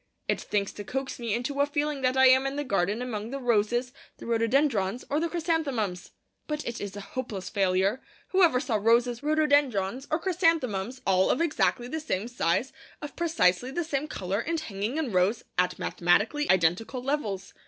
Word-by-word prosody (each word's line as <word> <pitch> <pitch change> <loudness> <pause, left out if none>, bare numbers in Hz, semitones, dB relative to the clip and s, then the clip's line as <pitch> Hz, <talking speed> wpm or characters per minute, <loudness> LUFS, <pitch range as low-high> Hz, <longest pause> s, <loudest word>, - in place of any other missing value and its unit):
It - - 0
thinks 200 -1 -1
to 205 - -7
coax 265 +7 -4
me 230 -3 -1
into 275 +4 -1
a 285 - +3
feeling 290 -1 -1
that 255 0 +1
I 265 - +6
am 260 +1 +6
in 270 - -3
the 290 - -2
garden 205 0 0
among 220 -3 -4
the 275 - -4
roses, 240 0 +1 0.2
the - - -10
rhododendrons, 230 -2 +1
or 295 - +2
the 335 +1 -1
chrysanthemums. 285 - -1 0.4
But 300 -1 -3
it 235 0 -4
is 200 -1 -5
a 205 - -6
hopeless 210 -4 -5
failure. 195 +4 +1 0.3
Whoever 350 -9 +4
saw 245 -5 0
roses, 235 +3 +2
rhododendrons, 285 -7 +1
or 310 - +1
chrysanthemums, 315 - 0
all 190 -1 +3
of - - +2
exactly 290 -6 +1
the 315 +5 -3
same 225 -9 -2
size, 245 +1 0 0.3
of 295 -3 -8
precisely 255 - +2
the 345 +6 -2
same 300 -2 -2
colour, 195 -7 -3
and 330 +6 -2
hanging 220 -1 -4
in 305 -7 -1
rows 185 +5 +1 0.2
at 180 0 +1
mathematically 210 +12 +1
identical 190 +8 +2
levels? 225 -9 -2
245 Hz, 180 wpm, -27 LUFS, 205-290 Hz, 0.4 s, I